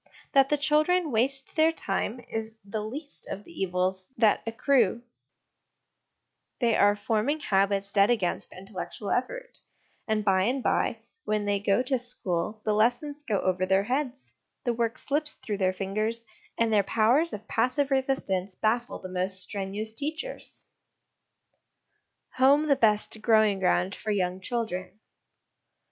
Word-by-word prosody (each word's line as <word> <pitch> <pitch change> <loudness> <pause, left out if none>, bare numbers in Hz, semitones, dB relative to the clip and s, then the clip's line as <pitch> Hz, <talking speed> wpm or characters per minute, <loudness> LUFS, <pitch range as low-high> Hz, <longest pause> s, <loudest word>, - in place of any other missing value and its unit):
That 275 -1 +5
the 295 - +2
children 305 +3 +2
waste 270 +4 +1
their 315 +1 +4
time 230 -3 -2
is 225 0 -5
the 210 +2 -4
least 285 +7 -7
of 200 - -6
the - - -15
evils 185 0 -1
that 220 -2 +4
accrue: 235 -1 +2 1.6
they 235 -3 +2
are 205 0 +4
forming 220 +8 0
habits 200 -4 +1
dead 200 0 +5
against 215 -7 0
intellectual 195 +2 -6
effort; - - -3 0.5
and 215 -2 0
by 190 -2 +3
and 255 +3 0
by, - - +1 0.3
when 210 -1 -1
they 205 0 +1
go 205 +4 +2
to 260 0 0
school, 210 -4 -2
the 215 - +2
lessons 245 +7 +1
go 210 -8 0
over 185 0 0
their 190 +1 +3
heads, 260 +3 -3 0.3
the 240 - 0
work 230 +1 -1
slips 300 +1 -1
through 205 -2 -5
their 185 -1 +2
fingers, 215 +5 -2 0.3
and 230 -1 +2
their 210 - +5
powers 235 - +2
of 210 - -8
passive 255 +4 +1
resistance 205 -9 0
baffle 235 +2 0
the - - -8
most 185 +1 -1
strenuous 200 +3 -3
teachers. 315 - -3 1.7
Home 280 +4 +5
the 280 - +5
best 215 -3 +1
Growing 215 -3 +4
ground 185 0 +1
for 215 - -6
Young 185 -3 0
Children. 195 -4 -4
220 Hz, 145 wpm, -27 LUFS, 195-265 Hz, 1.7 s, That